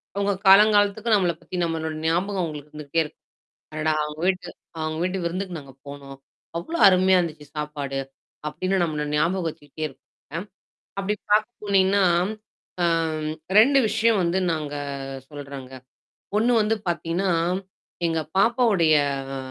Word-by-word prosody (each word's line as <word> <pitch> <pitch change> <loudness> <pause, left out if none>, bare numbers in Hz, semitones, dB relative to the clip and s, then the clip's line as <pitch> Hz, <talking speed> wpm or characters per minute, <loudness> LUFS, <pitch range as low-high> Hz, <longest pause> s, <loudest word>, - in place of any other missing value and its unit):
அவங்க 200 0 +1
காலங்காலத்துக்கு 205 +2 +5
நம்மள 180 -4 +2
பத்தி, - - -8
நம்மளோட 160 -1 -2
ஞாபகம் 185 +4 +1
அவங்களுக்கு 150 -2 -6
இருந்துகிட்டே 150 +2 -1
இருக்கும். 150 - -13 0.5
"அடடா! 155 0 0
அவங்க 150 0 -6
வீட்டு 185 -1 0 0.3
அவங்க 155 0 -2
வீட்டு 185 +1 -1
விருந்துக்கு 180 +1 -3
நாங்க 140 -2 -13
போனோம். 140 -1 -9 0.4
அவ்ளோ 320 - -4
அருமையா 185 0 +5
இருந்துச்சு 155 -4 -4
சாப்பாடு." 145 -2 -3 0.5
அப்படின்னு 185 +6 -1
நம்மள 150 -3 -2
ஞாபகம் 170 +3 +1
வெச்சுக்கிட்டே 155 0 -7
இருப்பாங்க. 150 +5 -10 0.6
அப்டி 200 +2 -1 0.2
பாக்க 215 +1 +4 0.2
போனீங்கன்னா, 200 0 +3 0.8
ஆம், 160 -2 0 0.3
2 275 +6 +6
விஷயம் 225 -1 +2
வந்து 175 +2 +1
நாங்க 150 -2 -3 0.5
சொல்றேங்க. 140 -3 -9 0.6
ஒண்ணு 235 +3 +3
வந்து 210 +1 +1
பாத்தீங்கன்னா, 175 +2 -1 0.8
எங்க 165 -1 0 0.2
பாப்பாவுடைய 205 -7 +4 0.4
ஆ, - - -4
170 Hz, 125 wpm, -24 LUFS, 150-195 Hz, 0.8 s, 2